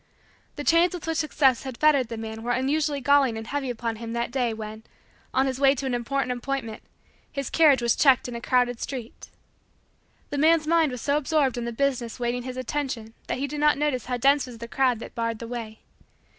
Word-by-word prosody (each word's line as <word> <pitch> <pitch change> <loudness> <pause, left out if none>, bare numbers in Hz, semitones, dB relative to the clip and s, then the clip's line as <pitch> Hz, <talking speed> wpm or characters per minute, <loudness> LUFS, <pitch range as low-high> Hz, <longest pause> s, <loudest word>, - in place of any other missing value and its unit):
The 290 - -5
chains 340 +3 +4
with 350 - -7
which 325 0 -1
Success 280 -5 +2
had 260 -3 -7
fettered 290 -5 +4
the 230 0 -6
man 220 0 -6
were 240 +2 -1
unusually 285 +3 0
galling 270 -3 +3
and 225 - -6
heavy 275 +1 -3
upon 230 -2 -3
him 230 0 -6
that 235 0 -2
day, 250 -3 0
when, 220 0 -7 0.5
on 265 - +2
his 265 -1 -2
way 275 0 +5
to 275 - -4
an 260 - -1
important 255 +2 -1
appointment, 245 -2 -4 0.5
his 275 -3 -4
carriage 290 -6 +5
was 235 -1 +3
checked 270 -4 +4
in 245 - -6
a 235 - -5
crowded 245 -1 +1
street. 250 -4 -7 1.0
The 285 - -2
man's 315 +1 +4
mind 325 -2 +3
was 250 -2 -6
so 285 +1 +1
absorbed 295 -3 +1
in 240 -1 -3
the 235 - -3
business 250 -1 -1
waiting 245 0 -1
his 255 +1 -7
attention 255 -4 -3
that - - -2
he 275 - -1
did 290 +1 -5
not 300 -1 +4
notice 285 -5 -1
how 250 -1 -1
dense 275 +3 +3
was 245 -2 -9
the 235 +1 -7
crowd 255 0 +1
that - - -9
barred 230 -1 -2
the 230 - -7
way. 230 -2 -7
255 Hz, 220 wpm, -25 LUFS, 235-285 Hz, 1.0 s, way